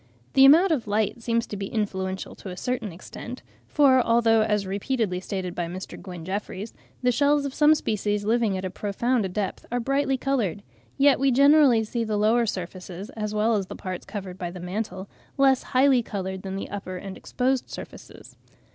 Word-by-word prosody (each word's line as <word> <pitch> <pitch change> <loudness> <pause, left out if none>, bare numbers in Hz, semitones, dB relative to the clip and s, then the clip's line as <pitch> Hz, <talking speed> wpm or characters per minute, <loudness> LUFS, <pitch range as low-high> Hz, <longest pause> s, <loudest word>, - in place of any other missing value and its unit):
The 270 - +7
amount 330 +7 +7
of 265 -9 0
light 210 +2 0
seems 230 0 0
to - - -7
be 195 -1 -4
influential 190 -3 -3
to 195 - -9
a 180 - -7
certain 230 -2 -3
extent; 190 +8 -9 0.2
for 270 -3 +5
although, 230 -1 +3
as 210 -2 +1
repeatedly 200 0 -1
stated 185 -1 -4
by 175 -1 -3
Mr. 185 +2 -7
Gwyn 180 -4 -8
Jeffreys, 200 +2 -5 0.3
the 250 - +4
shells 285 +3 +2
of 275 - -4
some 305 +1 +5
species 210 -5 -1
living 220 -3 +1
at 185 - -4
a 185 - -3
profound 210 +1 -1
depth 200 0 -3
are 245 - 0
brightly 275 +2 0
coloured, 235 - -1 0.3
yet 275 -1 +5
we 275 +1 +3
generally 275 -3 +5
see 230 +2 -2
the 215 -2 -1
lower 225 +3 +3
surfaces, 185 0 -6
as 210 -1 -4
well 215 +2 +2
as 195 -3 -1
the - - -7
parts 185 -1 -6
covered 195 -3 -7
by 175 -2 -3
the 180 +1 -9
mantle, 190 +2 -4 0.3
less 270 -2 +4
highly 260 -1 +3
coloured 190 -4 -5
than 190 0 -5
the 195 - -5
upper 185 -2 -5
and 190 +1 -7
exposed 260 0 -1
surfaces. - - -10
215 Hz, 190 wpm, -25 LUFS, 190-255 Hz, 0.3 s, The